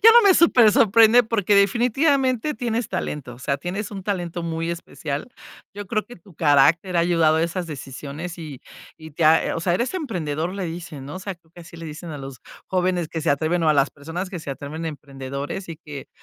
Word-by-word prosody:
Ya 455 - +10
no 475 - +9
me 395 -3 +6
super 245 -11 +6
sorprende 225 +3 +6
porque 215 -3 +1
definitivamente 255 - +2
tienes 235 -3 -2
talento, 135 -5 -4
o - - -16
sea, 140 +2 -1
tienes 190 +8 -4
un 195 -1 -6
talento 175 -3 -3
muy 165 0 -2
especial. 155 - -5 0.5
Yo 205 0 -7
creo 215 +1 -1
que 245 - -12
tu 175 0 -19
carácter 160 +5 +3
ha - - +5
ayudado 165 -2 +3
a 160 - +2
esas 175 +1 -2
decisiones, 145 +4 -7
y 155 -6 -8 0.4
y 160 -1 -12
te 160 +3 -1
ha, 160 +1 +6
eh - - -1
o 165 - -3
sea, 175 0 +1
eres 240 - -1
emprendedor, 175 - -2
le 195 -1 -4
dicen, 165 -5 -7
¿no?, 145 - -7
o - - -5
sea, 195 0 -5
creo 165 -1 -32
que 175 - -13
así 170 0 -13
le 165 - -8
dicen 160 +2 -8
a 150 - -6
los 135 -2 -9 0.3
jóvenes 180 -3 0
que 165 - -4
se 155 - +1
atreven 160 +5 +1
o 160 - +3
a 155 - +4
las 140 0 +3
personas 165 +6 -6
que 180 -3 -6
se 145 - -6
atreven, 145 +4 -6
"emprendedores" 140 +2 -6
y 165 - -6
que 150 -4 -9
170 Hz, 225 wpm, -23 LUFS, 150-200 Hz, 0.5 s, Ya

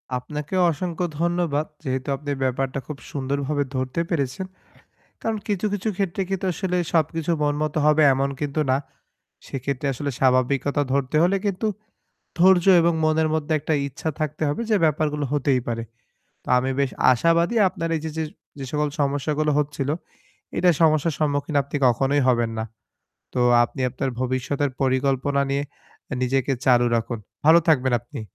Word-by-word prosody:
আপনাকেও 150 +8 -2
অসংখ্য 175 +3 -3
ধন্যবাদ। 170 -3 0 0.2
যেহেতু 130 -2 -3
আপনি 145 +1 -5
ব্যাপারটা 135 +1 -1
খুব 150 - -6
সুন্দরভাবে 140 +1 -1
ধরতে 130 +5 -1
পেরেছেন। 145 +2 -2 0.8
কারন 225 -1 -1
কিছু, 205 -1 -1
কিছু 205 +2 -1
ক্ষেত্রে 195 -1 -1
কিন্তু 195 0 -2
আসলে 180 +1 -1 0.2
সবকিছু 165 0 +1
মন 145 0 +2
মত 155 -1 -1
হবে 150 0 +5
এমন 135 +1 0
কিন্তু 145 +1 -2
না। 130 - +3 0.7
সেক্ষেত্রে 135 +1 -3
আসলে 140 +3 -3
স্বাভাবিকতা 135 +2 +2
ধরতে 140 +1 0
হলে 180 +3 +3
কিন্তু 200 +2 -1 0.7
ধৈর্য 180 0 +5 0.2
এবং 170 0 +3
মনের 155 0 +2
মধ্যে 155 0 -1
একটা 155 +2 -1
ইচ্ছা 145 +4 -4
থাকতে 155 0 -2
হবে 145 - -2
যে 215 - +4
ব্যাপারগুলো 150 -1 0
হতেই 135 -3 +2
পারে। 115 -1 -2 0.6
তো - - -23
আমি 130 +1 0
বেশ 140 -2 +1 0.2
আশাবাদি 165 - +2
আপনার 165 -2 -4
এই 155 - -3
যে, 160 - -2
যে 160 - 0 0.4
যে 135 - -4
সকল 150 0 0
সমস্যাগুলো 145 +2 0
হচ্ছিল, 140 -2 -2 0.7
এইটা 180 0 +4
সমস্যার 155 0 +3
সম্মুখীন 145 0 0
আপনি 140 +2 -5
কখনোই 135 +4 +2
হবেন 120 -2 +2
না। 110 - -1 0.7
তো 125 - 0 0.2
আপনি 130 - -8
আপনার 135 +2 -2
ভবিষ্যতের 130 +2 -1
পরিকল্পনা 135 +1 +1
নিয়ে 140 +1 0 0.5
এ - - 0
নিজেকে 135 +1 +1
চালু 120 -2 +5
রাখুন। 115 0 -1 0.3
ভালো 160 +3 +8
থাকবেন 130 -4 +3
আপনি। 120 -1 -9
145 Hz, 155 wpm, -23 LUFS, 135-160 Hz, 0.8 s, ভালো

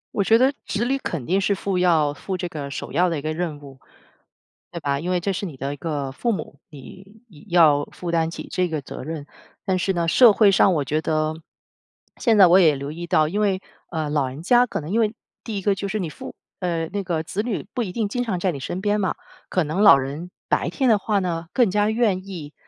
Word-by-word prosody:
我 200 - +2
觉 225 +3 +5
得 260 +4 +3
子 215 +3 -1
女 270 +2 0
肯 165 - -4
定 190 +7 +1
是 200 +1 +1
负 190 -1 -2
要 160 -5 +3
负 185 +5 -5
这 180 0 -3
个 150 -4 -6
首 140 - -6
要 175 +4 +2
的 165 - -2
一 - - -4
个 155 +2 -2
任 160 -3 -3
务。 135 -2 -13 0.9
对 170 - -5
吧？ 140 -2 -1
因 175 +4 -3
为 180 - +1
这 195 +3 -1
是 195 - -3
你 165 -7 -7
的 135 +2 -4
一 - - -9
个 145 -4 -3
父 235 - -1
母， 155 -7 -5
你 190 +9 -14 0.3
要 155 -5 +5
负 175 - -7
担 165 -1 +1
起 - - -8
这 180 0 +1
个 155 -2 -3
责 135 - -8
任。 155 0 -6 0.4
但 190 -3 +1
是 190 +2 0
呢， 170 -2 -1
社 230 +6 +7
会 205 0 +5
上 195 0 +4
我 150 - 0
觉 150 +3 -1
得， 155 0 0 0.8
现 230 -4 +2
在 190 - +9
我 175 +2 +6
也 160 -5 +5
留 140 +1 -5
意 170 +3 -6
到， 155 -2 +3
因 195 +7 -2
为， 195 -3 +1 0.3
呃， 160 -3 -2
老 145 -3 +1
人 135 +4 -9
家 245 +6 +5
可 235 - -4
能 150 +4 -7
因 225 - +2
为 215 -1 +1 0.3
第 215 -4 -4
一 - - -7
个 200 +1 +2
就 200 +1 -4
是 215 +2 -2
你 170 -5 -3 0.5
呃， 170 -3 -1
那 200 +3 -4
个 170 -4 -1
子 195 +5 -3
女 220 -5 -3
不 245 - 0
一 190 - -5
定 215 +2 -1
经 245 +4 -1
常 205 -7 -2
在 185 +1 +1
你 140 - -6
身 160 +7 -4
边 205 +1 +1
嘛， 190 - 0 0.4
可 185 - +1
能 155 +6 -2
老 200 - +9
人 145 +7 -6 0.2
白 - - +1
天 265 -3 +1
的 220 - +5
话 205 0 0
呢 170 -3 -3
更 245 -5 +3
加 210 +1 +2
愿 210 -5 0
意 160 -6 -8
180 Hz, 265 characters per minute, -23 LUFS, 155-200 Hz, 0.9 s, 在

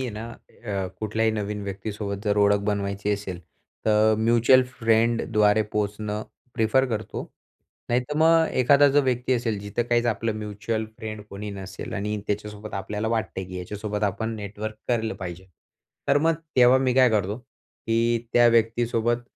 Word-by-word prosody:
आहे 130 -2 -2
ना 105 +1 -6
अ, 100 -5 -6
कुठल्याही 110 +1 +1
नवीन 105 -1 -3
व्यक्तीसोबत 100 0 -5
जर 105 -1 +1
ओळख 100 0 +4
बनवायची 100 0 -2
असेल. 100 -3 -4 0.5
तर 110 0 +4
म्युच्युअल 120 +3 +5 0.2
फ्रेंडद्वारे 115 -2 +3
पोहोचणं 105 0 -2 0.3
प्रिफर 115 +3 +3
करतो. 110 -1 -3 0.7
नाहीतर 125 +5 0
मग 165 0 +5
एखादा 140 +3 +6
जो 145 +1 +4
व्यक्ती 125 -1 0
असेल, 115 -4 0
जिथं 105 +3 -2
काहीच 120 0 +2
आपलं 115 -1 0
म्युच्युअल 105 +1 -3
फ्रेंड 110 -1 -6
कोणी 105 +1 -6
नसेल 95 -1 -7
आणि 105 +1 -2
त्याच्यासोबत 105 +1 -4
आपल्याला 105 +3 -3
वाटत 115 -1 -1
आहे, 95 - -4
की 90 0 -7
याच्यासोबत 105 +3 -4
आपण 110 +3 -2
नेटवर्क 105 +1 -6
करलं 115 -2 0
पाहिजे. 95 0 -7 0.6
तर 140 - +5
मग 165 +2 +2 0.2
तेव्हा 125 +1 +7
मी 130 -1 +1
काय 130 -1 +5
करतो, 105 0 0
की 115 -1 -2
त्या 120 0 +6
व्यक्तीसोबत 115 +1 +1
110 Hz, 150 wpm, -25 LUFS, 105-120 Hz, 0.7 s, तेव्हा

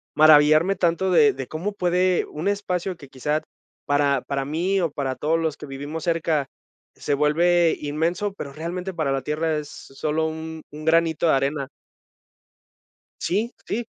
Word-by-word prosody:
maravillarme 155 +4 +6
tanto 175 +2 +1
de 215 +4 +5
de 135 -2 -6
cómo 185 +7 -4
puede 180 -1 +1
un 155 +6 -5
espacio, 190 -2 -1
que 140 -4 -14
quizá, 150 +4 -1 0.4
para 145 -2 +2
para 135 -1 -3
mí 175 +7 0
o 170 -3 +1
para 135 -2 -3
todos 160 +2 0
los 160 -3 -1
que - - -8
vivimos 145 +3 -6
cerca, 160 -4 0 0.5
se 145 - -2
vuelve 170 +3 +3
inmenso, 165 +7 -1
pero 140 -7 -7
realmente 180 +4 -5
para 155 -5 -1
la 135 -1 0
tierra 155 +1 -1
es 150 -1 -5
solo 155 +3 -3
un 160 0 -6
un 155 +1 -9
granito 165 0 +3
de - - +4
arena. 135 0 0 1.5
Sí, 215 +7 -1
sí. 235 +1 -2
160 Hz, 160 wpm, -23 LUFS, 145-175 Hz, 1.5 s, maravillarme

